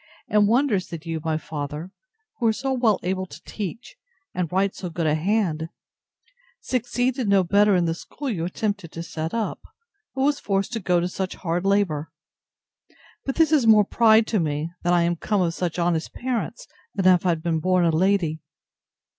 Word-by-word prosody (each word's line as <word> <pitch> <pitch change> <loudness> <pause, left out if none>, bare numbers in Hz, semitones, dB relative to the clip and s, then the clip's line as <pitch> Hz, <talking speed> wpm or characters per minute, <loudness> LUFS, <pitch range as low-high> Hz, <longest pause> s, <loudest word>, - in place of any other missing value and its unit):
and 210 -1 +3
wonders, 230 -5 +2
that 165 -1 -8
you, 165 -1 -3
my 160 -1 0
father, 150 +2 -6 0.5
who 235 - +2
are - - +5
so 265 +4 -2
well 240 -5 +2
able 185 +1 -2
to - - -11
teach, 225 - -6 0.4
and 175 -3 -2
write 195 +1 +1
so 180 - -6
good 165 0 -3
a 150 - +3
hand, 165 -2 0 0.9
succeeded 245 -1 -1
no 195 -1 +5
better 200 +3 +4
in 175 -1 +2
the 165 - 0
school 280 - -8
you 195 -10 -2
attempted 200 -1 -3
to 165 - -6
set 160 -1 -4
up; 230 -2 -2 0.6
but 265 - -1
was 290 +1 +2
forced 195 +3 -1
to 230 - -1
go 180 -3 +2
to 175 - 0
such 185 0 -4
hard 175 +1 -2
labour. 190 -7 +1 1.1
But 270 - -2
this 320 -2 +3
is 285 -7 +4
more 215 -2 +7
pride 220 0 +5
to 220 -2 0
me, 155 0 -2
that 175 - +1
I 175 -1 +4
am 170 0 0
come 205 +3 0
of 170 -2 +1
such 175 -1 -3
honest 170 -2 0
parents, 240 -3 -3 0.3
than 195 -2 -1
if 180 - +1
I 185 - +2
had 165 -2 0
been 165 -2 0
born 185 +1 +2
a 165 - +3
lady. 165 -2 +1
185 Hz, 195 wpm, -24 LUFS, 165-220 Hz, 1.1 s, more